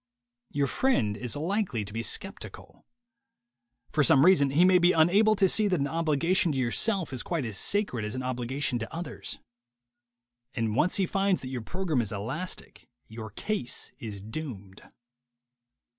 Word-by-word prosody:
Your 145 Hz, -1 st, 0 dB
friend 130 Hz, -, +1 dB
is 125 Hz, +3 st, -4 dB
likely 160 Hz, -, -1 dB
to 100 Hz, -, -10 dB
be 115 Hz, -, -2 dB
skeptical. 195 Hz, +11 st, -7 dB, 1.0 s
For 150 Hz, -, +2 dB
some 140 Hz, +2 st, +6 dB
reason 175 Hz, -7 st, +5 dB
he 155 Hz, +7 st, +4 dB
may 185 Hz, -1 st, +6 dB
be 175 Hz, +1 st, +4 dB
unable 200 Hz, +7 st, +4 dB
to 195 Hz, -1 st, +4 dB
see 215 Hz, +3 st, +3 dB
that 180 Hz, -4 st, +1 dB
an 140 Hz, -, +1 dB
obligation 165 Hz, +4 st, +1 dB
to -, -, -3 dB
yourself 160 Hz, -, +1 dB
is 130 Hz, -, -1 dB
quite 165 Hz, -7 st, -2 dB
as 110 Hz, -3 st, -5 dB
sacred 200 Hz, -, 0 dB
as 105 Hz, +2 st, -4 dB
an 130 Hz, -, -4 dB
obligation 130 Hz, +1 st, -2 dB
to 110 Hz, -, -6 dB
others. 165 Hz, -3 st, -5 dB, 1.2 s
And 115 Hz, -3 st, -1 dB
once 170 Hz, +8 st, +2 dB
he 195 Hz, -, +2 dB
finds 195 Hz, +1 st, +1 dB
that 130 Hz, -, -6 dB
your 130 Hz, -2 st, -4 dB
program 160 Hz, +1 st, -1 dB
is 110 Hz, -2 st, -5 dB
elastic, 130 Hz, -, -6 dB, 0.2 s
your 110 Hz, -1 st, -7 dB
case 125 Hz, -, -4 dB
is 105 Hz, -4 st, -7 dB
doomed. 105 Hz, -5 st, -7 dB
145 Hz, 160 wpm, -28 LUFS, 120-185 Hz, 1.2 s, some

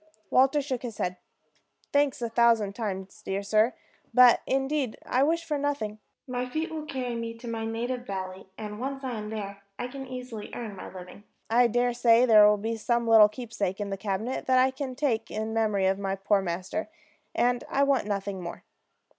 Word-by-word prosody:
Walter 270 Hz, +3 st, +4 dB
shook 260 Hz, -3 st, -3 dB
his 235 Hz, -4 st, -6 dB
head. 180 Hz, 0 st, -2 dB, 0.8 s
"Thanks, 285 Hz, -3 st, +2 dB
a 235 Hz, -, -1 dB
thousand 230 Hz, -3 st, +3 dB
times, 195 Hz, -4 st, -5 dB
dear 195 Hz, +1 st, -3 dB
sir, 215 Hz, +4 st, +2 dB, 0.4 s
but 250 Hz, -1 st, +7 dB
indeed 270 Hz, -2 st, 0 dB
I 255 Hz, -, +1 dB
wish 330 Hz, +4 st, +2 dB
for 300 Hz, -3 st, -2 dB
nothing. 280 Hz, -7 st, -2 dB, 0.3 s
My 250 Hz, 0 st, -3 dB
feet 315 Hz, +5 st, -2 dB
will 310 Hz, -1 st, -5 dB
carry 255 Hz, -4 st, -3 dB
me 230 Hz, 0 st, -4 dB
to 240 Hz, +1 st, -10 dB
my 225 Hz, -1 st, -3 dB
native 245 Hz, +2 st, -3 dB
valley; 190 Hz, -1 st, -5 dB
and 210 Hz, -1 st, -6 dB
once 270 Hz, +2 st, -4 dB
I 260 Hz, -, -2 dB
am 210 Hz, -2 st, -5 dB
there, 200 Hz, -2 st, -6 dB, 0.2 s
I 245 Hz, -, -3 dB
can 270 Hz, +1 st, -8 dB
easily 250 Hz, -4 st, -7 dB
earn 220 Hz, -4 st, -6 dB
my 185 Hz, -, -9 dB
living. 185 Hz, +2 st, -11 dB, 0.3 s
I 240 Hz, +1 st, +5 dB
dare 245 Hz, +1 st, +1 dB
say 235 Hz, 0 st, +5 dB
there 215 Hz, -3 st, +8 dB
will 210 Hz, -, +3 dB
be 225 Hz, +2 st, -3 dB
some 235 Hz, +1 st, 0 dB
little 220 Hz, -2 st, +8 dB
keepsake 215 Hz, -4 st, -4 dB
in 205 Hz, -1 st, -3 dB
the -, -, -1 dB
cabinet 205 Hz, +5 st, -3 dB
that 260 Hz, 0 st, +4 dB
I 260 Hz, +1 st, +4 dB
can 265 Hz, -1 st, -5 dB
take 245 Hz, -5 st, 0 dB
in 220 Hz, +1 st, -3 dB
memory 215 Hz, -4 st, +1 dB
of 190 Hz, +1 st, +2 dB
my 195 Hz, -1 st, -1 dB
poor 195 Hz, +1 st, +2 dB
master, 185 Hz, -, -3 dB, 0.5 s
and 245 Hz, 0 st, +2 dB
I 280 Hz, -, +2 dB
want 275 Hz, -6 st, +2 dB
nothing 200 Hz, -2 st, -3 dB
more." 170 Hz, 0 st, -7 dB
230 Hz, 195 wpm, -27 LUFS, 205-255 Hz, 0.8 s, there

